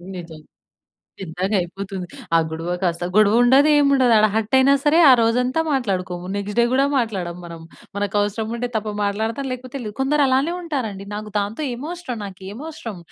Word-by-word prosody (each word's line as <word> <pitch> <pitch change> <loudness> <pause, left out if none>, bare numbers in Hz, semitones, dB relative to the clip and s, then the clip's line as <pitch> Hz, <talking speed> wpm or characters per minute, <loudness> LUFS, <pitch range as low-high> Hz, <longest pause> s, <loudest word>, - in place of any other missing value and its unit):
నిజం. 165 -3 -9 0.8
పెద్దగా 190 +3 -2
అయిపోతుంది. 190 +1 -6 0.3
ఆ - - +7
గొడవ 165 +2 -3
కాస్త, 175 -1 -1
గొడవ 210 -1 +5
ఉండదు, 270 +5 +5
ఏమి 280 -1 +4
ఉండదు. 255 -3 +4
ఆడ 215 - +5
హర్ట్ 220 +2 -1
అయినా 275 +2 +5
సరే, 300 +3 +4
ఆ - - +9
రోజంతా 250 +6 +1
మాట్లాడుకోము. 185 -8 -2
నెక్స్ట్ 200 +1 -4
డే 235 - +5
కూడా 270 +2 +3
మాట్లాడము 190 -8 -3
మనం. 170 -1 -9 0.4
మనకు 205 0 -2
అవసరం 205 +2 -1
ఉంటే 245 +1 -3
తప్ప, 215 0 -3 0.2
మాట్లాడతా, 220 +6 -2
లేకపోతే 255 +1 -6
లేదు. 210 -2 -6
కొందరు 290 +2 +2
అలానే 270 +6 +1
ఉంటారండి. 220 - -4
నాకు 210 0 -6
దాంతో 205 +8 -3
ఏమవసరం, 295 +1 -6
నాకేమి 195 +7 -9
అవసరం, 230 - -7
215 Hz, 170 wpm, -21 LUFS, 190-260 Hz, 0.8 s, ఆ